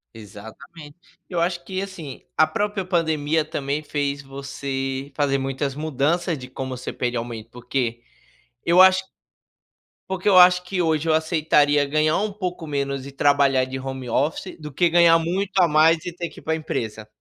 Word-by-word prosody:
Exatamente. 125 - -12 0.3
Eu 175 -2 -2
acho 175 0 -1
que, 190 0 -3
assim, 170 -9 -8 0.2
a 155 - +6
própria 200 +3 -2
pandemia 160 -3 +1
também 145 -1 -3
fez 145 -1 -2
você 135 0 -5
fazer 140 -2 +1
muitas 135 +1 -2
mudanças 155 +3 -1
de 125 - -9
como 130 0 -6
você - - -6
pede 120 -1 -2
aumento 115 -1 -6
porque, 120 -1 -3 0.7
eu 175 +2 +6
acho 190 0 +6 1.0
Porque 190 +1 -3
eu 190 -2 +6
acho 180 0 +7
que 180 -1 -2
hoje 160 -1 0
eu 160 - +3
aceitaria 150 -3 +2
ganhar 155 +2 +1
um 210 +1 -1
pouco 180 -5 -5
menos 140 -2 -2
e - - -9
trabalhar 140 -2 +3
de 130 0 -6
home 130 -2 -6
office, 150 +9 -1
do 150 -1 -8
que 175 +4 +2
ganhar 170 -1 +6
muito 185 +4 -2
a 175 - +6
mais 160 +2 +4
e 175 - -5
ter 170 -1 -5
que - - -14
ir - - -18
para 160 - -1
a - - +1
empresa. 110 -8 -5
150 Hz, 180 wpm, -23 LUFS, 135-170 Hz, 1.0 s, acho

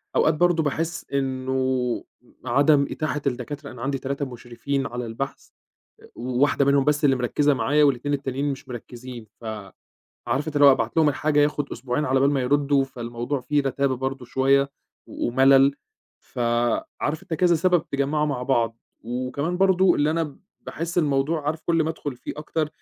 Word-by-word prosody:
أوقات 155 - +4
برضه 170 0 +2
باحِس 165 +3 -2
إنه 130 -2 -1 0.4
عدم 140 +3 +4
إتاحة 150 -2 -2
الدكاترة، 140 +3 -4
أنا 120 -1 -11
عندي 135 0 -1
3 140 +2 -3
مُشرفين 130 +2 -4
على 120 0 -5
البحث، 115 +5 -6 0.5
آآ - - -16
وواحدة 130 +3 +1
منهم 140 -1 +3
بس 150 0 +1
اللي 135 -2 +4
مركِّزة 145 +4 +1
معايا 145 +3 +3
وال2 145 +1 +1
التانيين 135 0 -2
مش 135 - -10
مركِّزين، 120 -1 -9
ف - - -14 0.8
عارف 130 +6 -1
أنت 150 - -5
اللي 145 - +7
هو 140 - +9
أبعت 115 +2 -2
لهم 155 -2 +5
الحاجة 150 +1 +1
ياخُد 145 -1 0
أسبوعين 130 +4 -2
على 130 +1 +2
بال 140 +1 +4
ما 140 -2 +1
يردّوا، 140 +1 +2
فالموضوع 120 +1 -4
فيه 145 +3 0
رَتابة 135 -1 0
برضه 130 0 -4
شوية 135 +2 +2 0.4
ومَلَل، 135 +2 +4 0.4
فعارف 120 +5 -2
أنت 165 - -4
كذا 175 +2 +3
سبب 180 +3 +2
اتجمّعوا 145 +2 -1
مع 135 -4 -2
بعض. 115 -3 0 0.3
وكمان 130 +8 -2
برضه 190 -1 +4
اللي 150 +1 +2
أنا 160 -3 -2 0.2
باحِس 170 +2 -4
الموضوع 145 0 0
عارف 160 +1 -2
كل 165 -1 +2
ما 160 - -1
أدخُل 145 -4 -6
فيه - - -6
أكتر، 155 0 -2
140 Hz, 165 wpm, -24 LUFS, 130-150 Hz, 0.8 s, هو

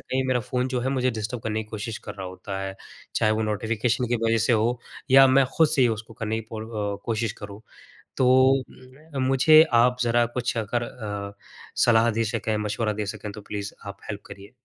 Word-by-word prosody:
कहीं 130 +1 -2
मेरा 125 -1 +2
फ़ोन 125 +3 -2
जो 130 -1 -1
है 130 - -1
मुझे 130 -1 +1
डिस्टर्ब 115 +1 -5
करने 110 0 -2
की - - -23
कोशिश 110 +1 -5
कर 105 - -6
रहा 95 -2 -6
होता 95 +2 -6
है। 95 0 -4 0.4
चाहे 110 - +2
वो 110 +1 0
नोटिफ़िकेशन 110 +3 -1
की 120 - +1
वजह 115 0 +3
से - - +3
हो 115 +2 +1 0.3
या 135 0 +9
मैं 135 +1 +5
खुद 160 -2 +5
से 145 -3 +2
ही 125 - +5
उसको 110 0 -5
करने 110 -2 -3
की 110 - -13
पूर 110 -1 -5
अ, 105 -3 -3
कोशिश 115 -1 -1
करूँ। 100 0 -8 0.6
तो 130 - +3 0.4
मैं 135 +3 -11
मुझे 145 +4 +7
आप 125 +2 +4
ज़रा 120 0 +3
कुछ 120 +1 -3
अगर 115 +2 -1
अ, 105 -4 -6 0.5
सलाह 115 -1 +4
दे 115 +1 0
सकें, 110 -1 -2
मशवरा 105 +1 -1
दे 105 0 -3
सकें 105 +1 -6
तो 105 - -10
प्लीज़ 100 0 -6
आप 100 0 -7
हेल्प 105 -1 -5
करिए। 100 +2 -12
115 Hz, 215 wpm, -25 LUFS, 105-125 Hz, 0.6 s, या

